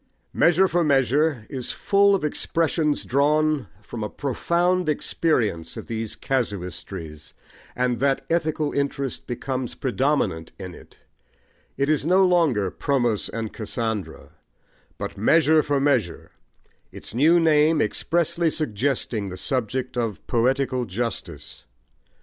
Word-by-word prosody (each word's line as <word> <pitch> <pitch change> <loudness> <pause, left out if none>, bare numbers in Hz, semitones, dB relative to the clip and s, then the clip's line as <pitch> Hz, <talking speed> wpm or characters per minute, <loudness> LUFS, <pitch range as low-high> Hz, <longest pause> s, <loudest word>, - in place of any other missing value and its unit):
Measure 175 +3 +4
for 175 -1 +1
Measure 140 -2 +2
is 130 -3 -4
full 200 0 +3
of 190 - -3
expressions 155 0 0
drawn 150 -1 +2 0.2
from 110 0 -6
a 105 - -3
profound 170 +5 0
experience 115 - 0
of - - -7
these 115 -1 -4
casuistries, 90 - -4 0.4
and 125 -1 0
that 135 0 +1
ethical 155 -3 0
interest 140 -1 -2
becomes 130 0 -4
predominant 130 - -1
in 95 -2 -8
it: - - -16 0.8
it 140 +1 +1
is 150 -2 +1
no 185 +4 +4
longer 150 - +2
Promos 120 -7 0
and 115 -2 -4
Cassandra, 110 -2 -4 0.7
but - - -6
Measure 155 +7 +4
for 145 -2 0
Measure, 130 -11 0 0.6
its - - -11
new 155 +8 +5
name 155 -1 +4
expressly 170 +1 +1
suggesting 120 -6 -2
the 90 - -7
subject 130 +4 -2
of 115 -5 -3
poetical 130 +1 +1
justice. 115 +3 -5
135 Hz, 120 wpm, -24 LUFS, 115-155 Hz, 0.8 s, new